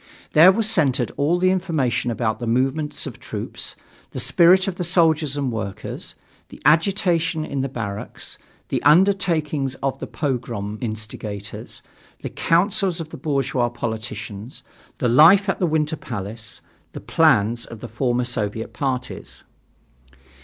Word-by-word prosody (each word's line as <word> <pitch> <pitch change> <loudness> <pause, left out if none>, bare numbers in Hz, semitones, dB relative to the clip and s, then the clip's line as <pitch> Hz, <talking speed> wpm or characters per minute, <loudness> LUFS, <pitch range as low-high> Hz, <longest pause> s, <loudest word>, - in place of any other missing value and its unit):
There 165 +5 +8
was 215 +2 +1
centered 140 - +2
all 155 +5 +2
the 185 +1 +3
information 160 -11 0
about 115 -2 -1
the 120 - -4
movements 135 +6 0
of - - -5
the - - -19
troops, - - -5 0.3
the - - -6
spirit 185 +3 +5
of 185 -2 -3
the 180 - -2
soldiers 160 -5 +2
and 140 -3 -1
workers, 105 -3 -6 0.3
the - - -12
agitation 170 0 +2
in 140 -3 -3
the 135 - -2
barracks, 105 -5 -6 0.3
the - - -1
undertakings 155 -5 +3
of 135 0 -3
the - - -5
pogrom 115 -7 -3
instigators, 110 -2 -6 0.4
the - - -4
councils 185 +1 +1
of 160 -1 -6
the - - -9
bourgeois 135 -5 0
politicians, 110 -1 -6 0.3
the 125 - 0
life 165 - +7
at 195 - 0
the 180 - +2
Winter 155 0 0
Palace, 105 -3 -6 0.3
the - - -6
plans 115 +3 +2
of 115 - -10
the - - -7
former 120 +2 0
Soviet 115 -2 -3
parties. 130 -4 -4
135 Hz, 145 wpm, -22 LUFS, 115-165 Hz, 0.4 s, There